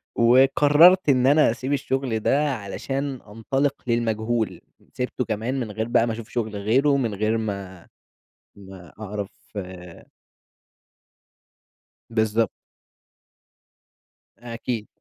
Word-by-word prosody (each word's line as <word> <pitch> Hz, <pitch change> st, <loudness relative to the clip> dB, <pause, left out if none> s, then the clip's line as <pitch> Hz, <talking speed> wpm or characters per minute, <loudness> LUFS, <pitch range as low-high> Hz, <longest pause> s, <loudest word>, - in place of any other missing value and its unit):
وقررت 145 Hz, +8 st, +5 dB
إن 130 Hz, -2 st, +4 dB
أنا 145 Hz, -2 st, +5 dB
أسيب 130 Hz, +4 st, -3 dB
الشغل 130 Hz, -4 st, -1 dB
ده؛ -, -, -1 dB, 0.2 s
علشان 135 Hz, +4 st, -4 dB
أنطلق 135 Hz, +7 st, -1 dB
للمجهول، 115 Hz, -1 st, -1 dB, 0.3 s
سِبته 125 Hz, 0 st, -3 dB
كمان 115 Hz, +5 st, -2 dB
من 115 Hz, -4 st, -4 dB
غير 110 Hz, +2 st, -3 dB
بقى 120 Hz, -1 st, +2 dB
ما 115 Hz, -, -1 dB
أشوف 115 Hz, +1 st, -8 dB
شغل 110 Hz, -4 st, -3 dB
غيره، 130 Hz, +8 st, +2 dB
من 115 Hz, -6 st, -1 dB
غير 110 Hz, +3 st, 0 dB
ما 100 Hz, -5 st, -5 dB, 0.7 s
ما 95 Hz, -4 st, -13 dB
أعرف 105 Hz, -1 st, -5 dB, 2.8 s
بالضبط. 110 Hz, -1 st, +1 dB, 1.9 s
أكيد. 115 Hz, -1 st, -5 dB
115 Hz, 100 wpm, -23 LUFS, 110-130 Hz, 2.8 s, وقررت